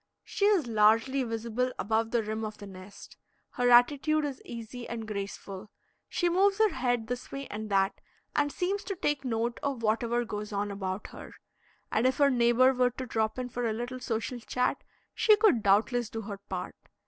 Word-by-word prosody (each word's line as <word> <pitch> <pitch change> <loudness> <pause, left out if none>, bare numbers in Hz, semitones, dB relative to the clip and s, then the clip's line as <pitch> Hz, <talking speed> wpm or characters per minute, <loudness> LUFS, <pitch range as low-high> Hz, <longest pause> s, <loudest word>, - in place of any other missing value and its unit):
She 400 - -1
is 400 -8 +4
largely 225 +4 +3
visible 235 +1 -2
above 225 +2 0
the 235 -1 +1
rim 215 +1 -3
of 215 -1 -5
the 205 - -9
nest. 190 0 -12 0.3
Her 245 -2 +1
attitude 285 +5 +4
is 275 -2 -5
easy 235 +1 -8
and 225 -2 -5
graceful; 200 -1 -6 0.4
she 350 - 0
moves 390 +3 +3
her 435 0 +4
head 245 -4 0
this 245 +2 -5
way 275 0 -5
and 215 +1 -5
that, 195 0 +1 0.3
and 290 0 +2
seems 390 +5 -2
to 395 0 -3
take 295 -6 -1
note 235 -1 -1
of 270 -5 -3
whatever 235 +2 +1
goes 210 -1 -5
on 205 0 -2
about 190 0 -4
her; - - -11 0.6
and 230 +4 +3
if 260 - 0
her 280 -1 +4
neighbor 245 +1 +4
were 250 -1 +3
to 255 +1 -6
drop 220 -1 -1
in 250 -1 -3
for 245 0 -2
a - - -1
little 245 +3 -5
social 240 0 -3
chat, 250 +2 -1 0.3
she 430 - +5
could 415 - +4
doubtless 220 +4 +2
do 225 - -5
her 200 -2 -7
part. - - -4
240 Hz, 190 wpm, -29 LUFS, 215-260 Hz, 0.6 s, she